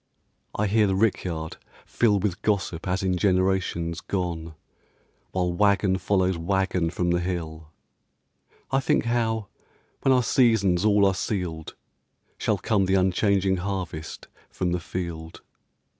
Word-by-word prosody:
I 105 - 0
hear 105 +1 +3
the 95 - +1
rickyard 90 -6 -1 0.3
fill 110 -4 +2
With 95 -2 -2
gossip 95 -5 -1
as 95 +1 -1
in 90 -1 +1
generations 90 -3 0
gone, 85 -4 -3 0.7
While 90 -2 -1
wagon 100 0 +2
follows 95 -1 +1
wagon 95 -1 0
from 85 +1 -1
the 85 - +2
hill. 80 -3 -4 1.0
I 135 - +3
think 130 - +1
how, 115 -3 0 0.5
when 135 - +3
our 125 -1 +4
seasons 110 -7 +3
all 105 -1 +4
are 95 - +3
sealed, 90 -5 -4 0.6
Shall - - +1
come 100 -3 +1
the 95 - +2
unchanging 95 0 +2
harvest 90 -4 -5 0.2
from 90 -1 -2
the 90 - 0
field. 85 -2 -6
95 Hz, 130 wpm, -25 LUFS, 85-100 Hz, 1.0 s, our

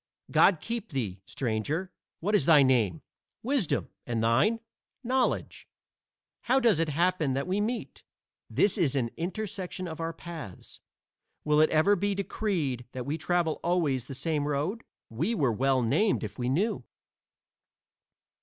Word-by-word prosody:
"God 180 -6 +5
keep 230 -1 -4
thee, 100 -8 -3
stranger; 135 - -2 0.3
what 205 +6 -1
is 200 -10 +3
thy 150 -4 +7
name?" 110 - +2 0.4
"Wisdom. 255 - 0 0.2
And 115 -2 -1
thine?" 140 - +3 0.4
"Knowledge. 255 +1 -1 0.8
How 260 +2 +4
does 230 -10 +4
it 165 -1 +1
happen 165 -2 +1
that 135 +1 -1
we 190 +3 0
meet?" 230 +3 -3 0.5
"This 205 0 +2
is 145 -6 +2
an 120 -4 0
intersection 185 0 -4
of 160 0 -6
our 165 0 -2
paths." 165 - -9 0.6
"Will 150 0 +3
it 155 - +5
ever 160 +6 +4
be 200 +1 0
decreed 170 - -2
that 125 -1 -5
we 145 +3 -1
travel 165 0 0
always 150 -8 0
the 135 - -6
same 145 +1 -1
road?" 150 +11 -2 0.3
"We 165 - -1
were 135 - +2
well 130 +2 +2
named 195 - +2
if - - -6
we 125 0 0
knew." 190 - 0
160 Hz, 145 wpm, -28 LUFS, 135-200 Hz, 0.8 s, thy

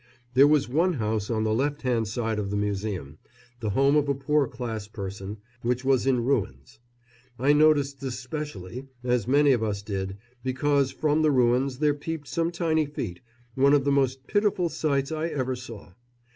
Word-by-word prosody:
There 135 +3 +7
was 150 -2 +3
one 165 +8 +2
house, 110 -5 -2
on 110 -2 0
the 110 0 +1
left 145 +5 -1
hand 120 -4 +1
side 110 0 -2
of 100 -1 -3
the 100 - -1
Museum, 100 -7 -3 0.4
the 110 -3 -2
home 135 +7 +3
of 145 -1 +2
a 140 - +2
poor 145 +1 +1
class 115 -5 -5
person, 100 -1 -6 0.2
which 125 +2 -1
was 135 -1 +2
in 125 -3 +2
ruins. 100 - -2 0.6
I 140 +4 +3
noticed 145 -2 +3
this 130 -3 -4
specially, 130 - -6 0.2
as 125 -3 0
many 145 +2 +5
of 120 -4 +2
us 100 -2 -2
did, 95 -2 -4 0.3
because 135 +1 +1
from 155 0 +1
the 155 - +4
ruins 125 0 +2
there 150 +1 +2
peeped 150 0 -6
some 165 +6 0
tiny 160 -3 0
feet 105 -11 -5 0.3
one 140 +3 +4
of 140 - +2
the 140 - +2
most 135 -1 +1
pitiful 205 -4 +1
sights 140 -3 -1
I 160 +1 -1
ever 130 -5 -2
saw. 115 -7 -10
130 Hz, 185 wpm, -26 LUFS, 110-145 Hz, 0.6 s, There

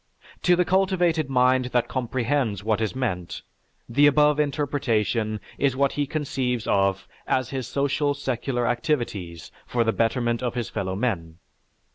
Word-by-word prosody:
To 180 - +4
the 180 0 +2
cultivated 180 -5 +2
mind 130 0 +3
that 125 -1 0
comprehends 125 -4 -1
what 110 0 0
is 110 +3 -1
meant, 95 -10 -3 0.4
the 140 +5 +4
above 150 0 +4
interpretation 125 -7 0 0.2
is 135 -2 +2
what 140 0 +2
he 145 -1 -1
conceives 130 -5 -2
of 95 -1 +1 0.2
as 130 -1 0
his 130 -3 -3
social 145 +1 0
secular 130 -2 -2
activities 120 - -2 0.2
for 120 -1 +1
the 115 -1 +1
betterment 120 +1 0
of 125 -1 -2
his 120 -2 -2
fellowmen. 95 -4 -2
125 Hz, 140 wpm, -24 LUFS, 115-145 Hz, 0.4 s, To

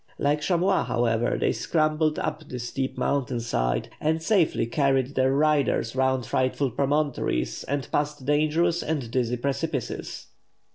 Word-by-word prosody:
Like 145 +1 +1
chamois, 185 +3 +2
however, 120 -1 +1
they - - +2
scrambled 155 -1 +1
up 155 0 -3
the 125 - -5
steep 130 +2 -3
mountain 135 -3 0
side, - - -1
and 160 +1 +1
safely 165 - +2
carried 135 +1 +1
their 130 0 +2
riders 140 -5 +1
round 130 -1 +1
frightful 130 +1 0
promontories 140 - -1
and 140 -2 -2
past 145 -2 -1
dangerous 155 +4 +2
and 140 -7 -3
dizzy 125 -1 0
precipices. 140 +1 -3
140 Hz, 135 wpm, -26 LUFS, 125-155 Hz, -, chamois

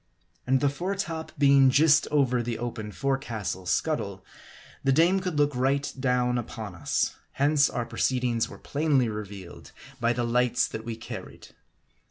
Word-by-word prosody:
And 130 0 +3
the 145 - +3
fore 180 +8 -3
top 165 -4 -4
being 140 -1 +6
just 150 +3 +4
over 130 -4 +2
the 115 -1 -3
open 115 -3 -5
forecastle 115 -9 -3
scuttle, - - -1 0.6
the 135 - +3
dame 170 +7 +4
could 180 -5 -3
look 145 -2 +2
right 135 +3 0
down 125 -1 +1
upon 110 -4 -7
us; 90 - -1 0.2
hence 145 +1 +3
our 120 - -3
pro 115 - -9
ceedings 125 -3 +1
were - - -10
plainly 140 -5 +1
revealed 100 -4 -8 0.3
by 115 0 +2
the 120 0 -1
lights 120 +1 +2
that 110 - -7
we 115 -1 -4
carried. 110 - -9
125 Hz, 160 wpm, -27 LUFS, 115-145 Hz, 0.6 s, being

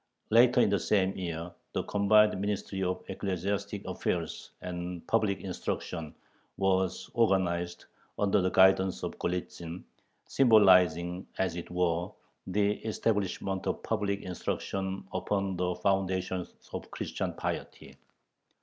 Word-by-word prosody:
Later 120 +2 +6
in 100 - +3
the 100 - +2
same 95 -2 +2
year, 85 -2 -4 0.2
the - - -1
combined 105 +1 +4
Ministry 100 -1 -2
of 90 0 -1
Ecclesiastic 95 0 -3
Affairs - - -3
and 90 -1 -5
Public 105 -3 +1
Instruction 80 -4 -4 0.4
was 95 -1 0
organized, 90 -6 +1 0.3
under 100 0 +3
the 95 - +2
guidance 95 -6 +4
of - - -4
Golitzin, 85 -1 -4 0.4
symbolizing, 90 -7 +4
as 95 -3 0
it 85 - -6
were, 90 -1 0 0.4
the 100 +2 +1
establishment 100 -3 -1
of - - -2
public 100 -2 -1
instruction 95 +1 -3
upon 100 -2 -1
the 90 0 -1
foundations 95 -1 0 0.2
of - - -5
"Christian - - -3
piety." - - -5
95 Hz, 115 wpm, -30 LUFS, 90-100 Hz, 0.4 s, Later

